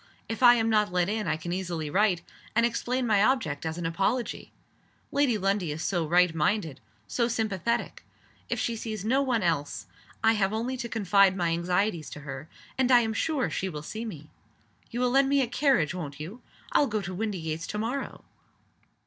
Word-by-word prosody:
"If 225 Hz, +1 st, -5 dB
I 245 Hz, -1 st, +8 dB
am 225 Hz, -1 st, +1 dB
not 210 Hz, -3 st, +2 dB
let 180 Hz, 0 st, +1 dB
in 215 Hz, -2 st, -2 dB
I 155 Hz, 0 st, +1 dB
can 175 Hz, +2 st, -4 dB
easily 175 Hz, -4 st, -3 dB
write 185 Hz, +2 st, +2 dB, 0.3 s
and 235 Hz, 0 st, +4 dB
explain 245 Hz, +2 st, -1 dB
my 210 Hz, -4 st, +3 dB
object 170 Hz, -, +1 dB
as 160 Hz, +1 st, -4 dB
an 175 Hz, -, -4 dB
apology. 195 Hz, +9 st, -1 dB, 0.6 s
Lady 280 Hz, -6 st, +2 dB
Lundie 195 Hz, -4 st, 0 dB
is 155 Hz, +3 st, -4 dB
so 175 Hz, -5 st, 0 dB
right 175 Hz, +1 st, +4 dB
minded, 165 Hz, -1 st, 0 dB, 0.3 s
so 235 Hz, -2 st, +1 dB
sympathetic. 230 Hz, 0 st, -1 dB, 0.5 s
If -, -, -1 dB
she 235 Hz, -, -1 dB
sees 215 Hz, -3 st, -5 dB
no 260 Hz, +5 st, +3 dB
one 245 Hz, -6 st, +1 dB
else 155 Hz, -4 st, -1 dB, 0.4 s
I 225 Hz, -, +6 dB
have 200 Hz, -2 st, +1 dB
only 235 Hz, +4 st, -2 dB
to 240 Hz, -1 st, -5 dB
confide 200 Hz, -3 st, +3 dB
my 175 Hz, -2 st, +1 dB
anxieties 175 Hz, 0 st, 0 dB
to 150 Hz, -, -9 dB
her, 140 Hz, +1 st, -7 dB, 0.3 s
and 260 Hz, -1 st, +3 dB
I 245 Hz, -1 st, +7 dB
am 220 Hz, -1 st, -1 dB
sure 290 Hz, +2 st, 0 dB
she 190 Hz, -, -2 dB
will 150 Hz, -3 st, -6 dB
see 220 Hz, +8 st, -5 dB
me. 155 Hz, -9 st, -8 dB, 0.6 s
You 240 Hz, -, -3 dB
will 250 Hz, -1 st, +2 dB
lend 270 Hz, +1 st, +4 dB
me 280 Hz, 0 st, +4 dB
a -, -, -2 dB
carriage, 245 Hz, -, +2 dB
won't 150 Hz, -6 st, -6 dB
you? 190 Hz, +11 st, -8 dB, 0.3 s
I'll 290 Hz, -, +4 dB
go 215 Hz, -3 st, -1 dB
to 185 Hz, +1 st, -5 dB
Windygates 175 Hz, -6 st, -3 dB
to 210 Hz, -, -4 dB
morrow." 240 Hz, +6 st, -4 dB
205 Hz, 195 wpm, -28 LUFS, 170-235 Hz, 0.6 s, I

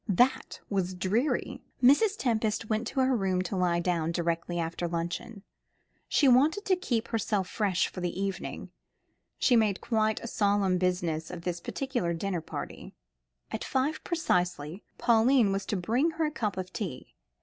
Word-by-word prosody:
That 250 Hz, +7 st, +2 dB
was 185 Hz, -2 st, -1 dB
dreary. 245 Hz, +7 st, 0 dB, 0.2 s
Mrs. 390 Hz, -, +5 dB
Tempest 225 Hz, -, 0 dB
went 220 Hz, +2 st, 0 dB
to 270 Hz, -, 0 dB
her 260 Hz, 0 st, +3 dB
room 190 Hz, -4 st, 0 dB
to 185 Hz, +2 st, -4 dB
lie 180 Hz, -2 st, +2 dB
down 170 Hz, -2 st, 0 dB
directly 170 Hz, 0 st, -1 dB
after 170 Hz, +1 st, -2 dB
luncheon. 175 Hz, +5 st, -4 dB, 0.7 s
She 285 Hz, -, +4 dB
wanted 290 Hz, -, +4 dB
to 380 Hz, -, +3 dB
keep 240 Hz, -11 st, -2 dB
herself 210 Hz, -4 st, 0 dB
fresh 195 Hz, -2 st, +1 dB
for 185 Hz, -, -8 dB
the 175 Hz, +1 st, -3 dB
evening. 195 Hz, -1 st, -4 dB, 0.7 s
She 250 Hz, -, +4 dB
made 215 Hz, -4 st, +3 dB
quite 220 Hz, -2 st, +1 dB
a -, -, -7 dB
solemn 200 Hz, -4 st, +1 dB
business 175 Hz, -3 st, -1 dB
of 175 Hz, -1 st, -7 dB
this 175 Hz, -1 st, -2 dB
particular 245 Hz, -6 st, -2 dB
dinner 180 Hz, 0 st, -2 dB
party. -, -, -7 dB, 0.6 s
At -, -, -3 dB
five 275 Hz, +4 st, -1 dB
precisely, 180 Hz, -, -1 dB, 0.2 s
Pauline 235 Hz, -1 st, +4 dB
was 195 Hz, +1 st, -2 dB
to 205 Hz, -, -1 dB
bring 235 Hz, -, +1 dB
her 325 Hz, -, +2 dB
a 300 Hz, -, -1 dB
cup 210 Hz, -9 st, -2 dB
of 185 Hz, 0 st, -5 dB
tea. 175 Hz, -, -5 dB
200 Hz, 160 wpm, -29 LUFS, 180-245 Hz, 0.7 s, Mrs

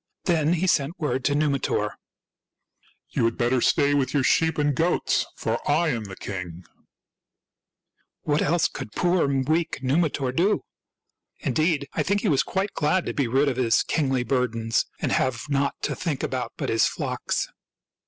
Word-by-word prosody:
Then 165 Hz, -3 st, +2 dB
he 175 Hz, +1 st, 0 dB
sent 165 Hz, -1 st, +1 dB
word 130 Hz, -4 st, -1 dB
to 145 Hz, -, +2 dB
Numitor: 145 Hz, -3 st, 0 dB, 0.4 s
— -, -, -61 dB
" -, -, -37 dB
You -, -, +2 dB
had 115 Hz, -, 0 dB
better 120 Hz, +1 st, +1 dB
stay 145 Hz, +2 st, +3 dB
with 135 Hz, -1 st, 0 dB
your 140 Hz, -, +3 dB
sheep 160 Hz, +4 st, +2 dB
and 145 Hz, -1 st, +2 dB
goats, 170 Hz, +5 st, +1 dB
for -, -, -2 dB
I 170 Hz, -1 st, +3 dB
am 115 Hz, -6 st, -2 dB
the 95 Hz, -1 st, -8 dB
king! 90 Hz, -3 st, -6 dB, 0.8 s
" -, -, -51 dB
What 150 Hz, 0 st, +1 dB
else 165 Hz, +2 st, +2 dB
could 105 Hz, -, -8 dB
poor, 175 Hz, -3 st, +2 dB, 0.2 s
weak 160 Hz, -1 st, -1 dB
Numitor 140 Hz, -1 st, +1 dB
do? 195 Hz, +7 st, +2 dB, 0.8 s
In -, -, -1 dB
deed, 155 Hz, -3 st, +1 dB
I -, -, 0 dB
think 200 Hz, +1 st, +1 dB
he 210 Hz, -, +1 dB
was 140 Hz, -4 st, +3 dB
quite 195 Hz, +1 st, -2 dB
glad 165 Hz, +4 st, +1 dB
to -, -, -3 dB
be 140 Hz, -4 st, 0 dB
rid 135 Hz, +5 st, +2 dB
of 130 Hz, -3 st, 0 dB
his 120 Hz, -3 st, +3 dB
kingly 135 Hz, -5 st, 0 dB
burdens 115 Hz, -3 st, 0 dB
and -, -, -1 dB
have 125 Hz, -3 st, 0 dB
nought 140 Hz, 0 st, +1 dB
to -, -, -1 dB
think 155 Hz, -7 st, -3 dB
about 130 Hz, -2 st, -3 dB
but -, -, -3 dB
his 115 Hz, -, +3 dB
flocks. -, -, -2 dB
140 Hz, 180 wpm, -25 LUFS, 125-160 Hz, 0.8 s, stay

